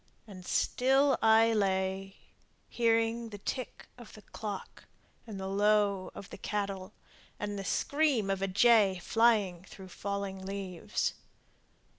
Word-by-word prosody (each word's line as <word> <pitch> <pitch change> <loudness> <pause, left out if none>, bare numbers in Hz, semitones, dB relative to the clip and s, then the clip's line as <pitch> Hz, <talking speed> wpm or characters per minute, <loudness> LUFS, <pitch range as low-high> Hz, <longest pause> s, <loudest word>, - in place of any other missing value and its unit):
And 190 -4 -11
still 270 +2 +2
I 225 +1 +5
lay 195 -1 -1 0.5
Hearing 230 0 +1
the 205 - -8
tick 255 +5 -5
of 235 -3 -12
the 215 - -13
clock, 205 -2 -7 0.4
and 205 -3 -7
the 190 - -5
low 200 -1 +2
of 200 - -9
cattle 200 -1 -3 0.5
And 205 0 -3
the - - -4
scream 270 -2 +1
of 195 -1 -2
a 195 - 0
jay 200 -1 +4
flying 205 -2 +2
through 190 -1 -12
falling 200 0 -4
leaves! 190 -3 -3
200 Hz, 125 wpm, -31 LUFS, 195-225 Hz, 0.5 s, I